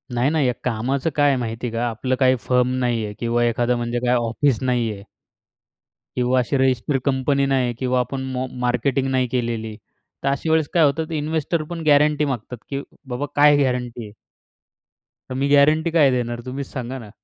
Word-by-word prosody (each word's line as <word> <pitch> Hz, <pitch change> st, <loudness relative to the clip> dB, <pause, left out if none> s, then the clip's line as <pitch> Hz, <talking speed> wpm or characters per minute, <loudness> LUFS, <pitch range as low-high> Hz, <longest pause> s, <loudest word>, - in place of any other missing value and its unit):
नाही, 120 Hz, +3 st, +2 dB
नाही. 150 Hz, -3 st, +1 dB
या 125 Hz, -, +1 dB
कामाचं 130 Hz, +5 st, -1 dB
काय 145 Hz, -1 st, +4 dB
आहे 135 Hz, -, +2 dB
माहिती 115 Hz, 0 st, -4 dB
आहे 115 Hz, -, -6 dB
का 120 Hz, +1 st, 0 dB
आपलं 125 Hz, +3 st, -2 dB
काही 130 Hz, -1 st, +4 dB
फर्म 125 Hz, 0 st, +1 dB
नाही 120 Hz, -3 st, 0 dB
आहे. 105 Hz, -, -6 dB
किंवा 120 Hz, 0 st, +1 dB
एखादं 120 Hz, +1 st, +1 dB
म्हणजे 120 Hz, 0 st, -2 dB
काय 125 Hz, -, +3 dB
ऑफिस 120 Hz, +2 st, +1 dB
नाहीये. 115 Hz, -6 st, -1 dB, 1.1 s
किंवा 125 Hz, +1 st, +2 dB
अशी 125 Hz, +3 st, 0 dB
रजिस्टर 130 Hz, +1 st, +1 dB
कंपनी 140 Hz, +1 st, +1 dB
नाही 130 Hz, -3 st, +1 dB
किंवा 130 Hz, -1 st, +1 dB
आपण 130 Hz, +2 st, -2 dB
म 130 Hz, -, -1 dB, 0.2 s
मार्केटिंग 125 Hz, +2 st, 0 dB
नाही 130 Hz, -1 st, +1 dB
केलेली. 115 Hz, -3 st, -3 dB, 0.5 s
तर -, -, +2 dB
अशा 140 Hz, +3 st, -1 dB
वेळेस 160 Hz, -2 st, +3 dB
काय 170 Hz, -2 st, +4 dB
होतं 155 Hz, +3 st, +1 dB
इन्व्हेस्टर 155 Hz, +1 st, -1 dB
पण 170 Hz, -1 st, -4 dB
गॅरंटी 150 Hz, +1 st, +4 dB
मागतात 125 Hz, -3 st, -4 dB
की 140 Hz, 0 st, -3 dB, 0.3 s
बाबा 125 Hz, +3 st, -2 dB
काय 145 Hz, 0 st, +6 dB
गॅरंटी 125 Hz, -3 st, -1 dB
आहे? 105 Hz, -, -11 dB, 1.2 s
तर -, -, -4 dB
मी 135 Hz, +2 st, 0 dB
गॅरंटी 155 Hz, +3 st, +4 dB
काय 150 Hz, -5 st, +4 dB
देणार 120 Hz, -1 st, -2 dB
तुम्हीच 130 Hz, +1 st, -5 dB
सांगा 130 Hz, 0 st, -5 dB
ना? 110 Hz, -4 st, -11 dB
130 Hz, 185 wpm, -22 LUFS, 120-140 Hz, 1.2 s, काय